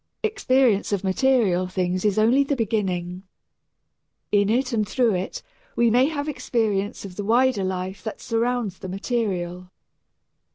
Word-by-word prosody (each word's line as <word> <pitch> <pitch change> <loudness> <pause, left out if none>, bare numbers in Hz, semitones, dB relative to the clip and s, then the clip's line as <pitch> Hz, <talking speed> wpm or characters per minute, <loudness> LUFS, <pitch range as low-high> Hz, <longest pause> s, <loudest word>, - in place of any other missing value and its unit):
Experience 260 - +2
of 200 -1 -1
material 195 -3 +2
things 185 0 -1
is 210 -1 +1
only 235 +6 +4
the 280 +1 -1
beginning. 185 -6 -2 1.1
In 205 -1 +3
it 250 +3 +1
and 215 -3 0
through 240 -4 +2
it 185 +1 -4 0.3
we 235 -1 +3
may 250 +4 +4
have 295 -2 -3
experience 215 -9 -1
of 180 -2 -10
the 205 - -3
wider 235 0 +2
life 185 +1 -4
that 220 - -5
surrounds 230 -3 -1
the 190 - -7
material. 185 -4 -3
210 Hz, 140 wpm, -23 LUFS, 185-245 Hz, 1.1 s, only